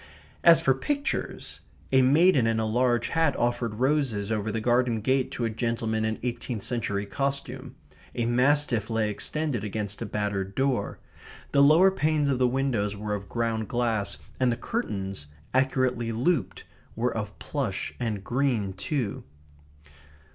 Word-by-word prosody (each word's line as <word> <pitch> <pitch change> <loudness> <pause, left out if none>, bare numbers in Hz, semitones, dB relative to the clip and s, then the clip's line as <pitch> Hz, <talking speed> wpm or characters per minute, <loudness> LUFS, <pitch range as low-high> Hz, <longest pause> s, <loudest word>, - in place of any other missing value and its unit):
As 165 -1 +7
for 135 - +4
pictures 285 - -3 0.3
a 130 0 +5
maiden 140 -1 +5
in 115 0 +1
a 110 - 0
large 120 +2 +1
hat 165 -4 +2
offered 120 -2 -1
roses 125 -5 0
over 110 0 -1
the 115 - -1
garden 120 0 +2
gate 130 +4 +1
to 120 - -2
a - - 0
gentleman 115 -1 -1
in 110 0 -1
eighteenth 120 -3 -3
century 110 -4 -2
costume. 135 +2 -3 0.4
A 120 - 0
mastiff 125 -2 +2
lay 110 -2 0
extended 145 +1 -2
against 105 0 -4
a 115 - -3
battered 100 -2 -2
door. 130 -6 0 0.5
The 140 - +4
lower 160 +7 +6
panes 155 -5 +1
of 130 -2 +1
the 125 - +4
windows 120 -6 0
were 105 0 -3
of 100 -1 -5
ground 115 -2 -1
glass, 115 -4 -1 0.2
and 130 -1 +3
the 115 - -2
curtains, 100 - -4 0.3
accurately 130 -3 +1
looped, 130 +7 0 0.3
were - - -1
of - - -4
plush - - -3
and 110 -5 -2
green 120 -5 0
too. 120 +2 -3
120 Hz, 150 wpm, -27 LUFS, 110-135 Hz, 0.5 s, As